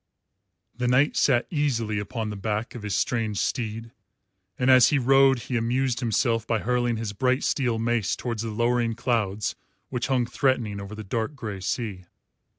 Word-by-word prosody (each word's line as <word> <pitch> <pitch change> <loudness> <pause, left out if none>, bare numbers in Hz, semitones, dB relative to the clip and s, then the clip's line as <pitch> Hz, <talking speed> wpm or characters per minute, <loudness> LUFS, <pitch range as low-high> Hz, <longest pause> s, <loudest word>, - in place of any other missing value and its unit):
The 125 +1 -1
knight 130 +4 +3
sat 125 -3 +3
easily 120 -9 0
upon 110 0 -4
the - - -5
back 105 +3 -3
of 120 - -7
his 105 -1 -2
strange 110 -4 0
steed, 115 +1 -2 0.7
and 130 +1 +3
as 130 -3 +7
he 145 - +2
rode 135 0 +4
he 125 - -4
amused 120 +2 0
himself 115 -1 0
by 115 - +1
hurling 120 +1 0
his 110 -2 -4
bright 130 +4 +1
steel 125 -5 0
mace 115 -2 0
towards 115 -3 -4
the 115 - -3
lowering 120 +1 +1
clouds 105 -4 -1 0.4
which 125 -2 -2
hung 130 -3 +1
threatening 120 -5 0
over 100 +2 -8
the 110 - -7
dark 110 +7 -3
grey 105 -7 -6
sea. 95 -2 -3
115 Hz, 170 wpm, -25 LUFS, 110-125 Hz, 0.7 s, as